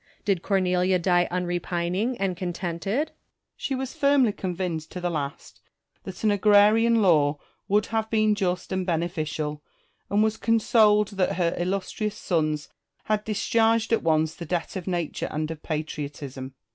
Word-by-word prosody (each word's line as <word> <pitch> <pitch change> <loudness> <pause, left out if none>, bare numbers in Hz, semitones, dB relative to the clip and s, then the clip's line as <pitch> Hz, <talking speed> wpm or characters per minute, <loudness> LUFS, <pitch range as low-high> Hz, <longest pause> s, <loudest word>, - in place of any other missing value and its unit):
Did 195 -4 +1
Cornelia 185 -1 +2
die 175 0 +2
unrepining 180 +5 -1
and 195 -2 0
contented? 180 - -2
Marcus. - - -31 0.4
She 270 - -3
was 260 0 -4
firmly 280 -6 +3
convinced 180 -5 -4
to 180 - -4
the 175 0 -2
last 140 -3 -5 0.4
that 190 +2 -8
an 215 - +4
agrarian 210 +3 +5
law 150 -5 +4 0.3
would 210 +1 +2
have 220 -1 -2
been 215 -1 +3
just 185 -3 -2
and 190 0 0
beneficial, 155 -4 -2 0.5
and 205 +1 +3
was 220 0 0
consoled 215 -2 +3
that 195 -3 0
her 170 -1 +1
illustrious 195 +3 -2
sons 155 -4 -1 0.4
had 215 -1 0
discharged 225 +1 +2
at 225 - +3
once 160 -1 +2
the 170 - -8
debt 175 +3 -2
of 185 -1 -5
nature 175 -4 -2
and 155 +1 -3
of 155 -2 -7
patriotism. 145 -4 -5
185 Hz, 150 wpm, -25 LUFS, 170-210 Hz, 0.5 s, agrarian